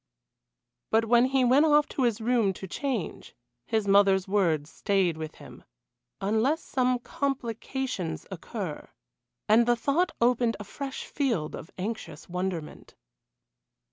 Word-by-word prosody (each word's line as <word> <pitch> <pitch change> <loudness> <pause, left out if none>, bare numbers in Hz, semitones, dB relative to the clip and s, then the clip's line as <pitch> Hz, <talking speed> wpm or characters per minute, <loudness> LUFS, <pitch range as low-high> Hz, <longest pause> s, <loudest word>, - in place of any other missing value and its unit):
But 225 +1 +3
when 240 +2 +5
he 260 -1 +2
went 260 +5 +5
off 295 -1 +5
to - - -3
his 235 -3 +2
room 225 -4 +2
to 190 - -8
change, 240 - -4 0.3
his 220 -2 0
mother's 195 -1 +4
words 170 -7 +1
stayed 195 -5 +1
with 155 0 -6
him - - -13 0.6
"unless 220 +10 +1
some 255 -2 +1
complications 245 - -3
occur" - - -6 0.6
and 230 +3 +5
the 240 - +4
thought 285 +9 +1
opened 235 -1 +2
a - - -5
fresh 270 +6 -6
field 230 - -1
of 165 - -9
anxious 190 -6 -5
wonderment. 180 -3 -5
225 Hz, 130 wpm, -28 LUFS, 190-255 Hz, 0.6 s, when